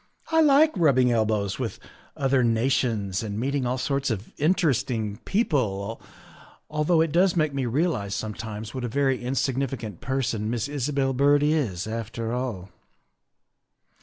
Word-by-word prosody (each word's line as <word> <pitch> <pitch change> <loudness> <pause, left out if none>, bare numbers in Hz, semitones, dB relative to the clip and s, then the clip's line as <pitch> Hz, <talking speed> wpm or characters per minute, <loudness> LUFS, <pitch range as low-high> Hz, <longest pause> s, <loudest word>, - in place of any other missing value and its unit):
" - - -21
I 320 0 +5
like 305 0 +5
rubbing 135 -8 +4
elbows 110 -3 0
with - - -3 0.4
other 135 -2 +2
nations 115 -5 +1
and 105 -2 -4
meeting 135 +1 -1
all 125 +1 -1
sorts 140 +1 -1
of 110 -2 -4
interesting 130 - +1
people, 115 - 0 0.7
although 155 +2 +2
it 165 -2 +1
does 180 +3 +3
make 155 -4 +1
me 135 -3 -1
realize 120 - 0
sometimes 110 0 -5
what 130 -2 -4
a - - -1
very 135 +1 0
insignificant 130 -5 -2
person 120 -5 -1
Miss 115 0 -1
Isabel 140 -1 -1
Byrd 145 +2 +4
is, 140 - 0
after 115 +1 -4
all." 120 -7 -3
130 Hz, 140 wpm, -25 LUFS, 110-145 Hz, 0.7 s, I